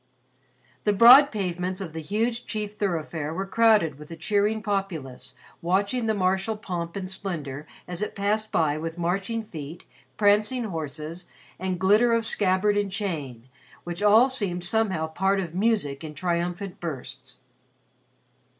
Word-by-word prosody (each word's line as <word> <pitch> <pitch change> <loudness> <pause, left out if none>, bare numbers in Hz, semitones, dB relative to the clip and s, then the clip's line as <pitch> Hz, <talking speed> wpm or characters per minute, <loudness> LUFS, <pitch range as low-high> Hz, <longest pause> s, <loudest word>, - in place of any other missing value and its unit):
The 210 - +2
broad 250 +7 +9
pavements 185 -2 -2
of 175 -5 -6
the 160 - -5
huge 230 +8 -2
chief 210 -1 -3
thoroughfare 165 -6 -2
were 190 +2 -2
crowded 205 -9 +3
with 150 - -11
a 165 - -7
cheering 210 +5 0
populace 185 -11 -4 0.3
watching 200 +7 0
the 220 - +1
martial 190 +3 0
pomp 170 -5 -5
and 190 -2 -4
splendor 155 -7 -5 0.2
as 175 +1 -5
it 210 - -3
passed 215 +2 0
by 155 -2 +1
with 165 +1 -5
marching 195 +6 -1
feet, 160 -4 -9 0.3
prancing 210 +4 +3
horses, 160 -2 -6 0.3
and 185 -1 -2
glitter 210 +5 +4
of 230 -1 +2
scabbard 205 -1 +2
and 200 -1 -2
chain, 150 - -4 0.4
which 175 +2 -5
all 215 +5 +6
seemed 200 -9 -2
somehow 190 -4 +1
part 190 +5 0
of 175 -4 -4
music 190 -9 0
in 155 -1 -7
triumphant 175 +2 -2
bursts. 130 -5 -7
190 Hz, 145 wpm, -25 LUFS, 165-210 Hz, 0.4 s, broad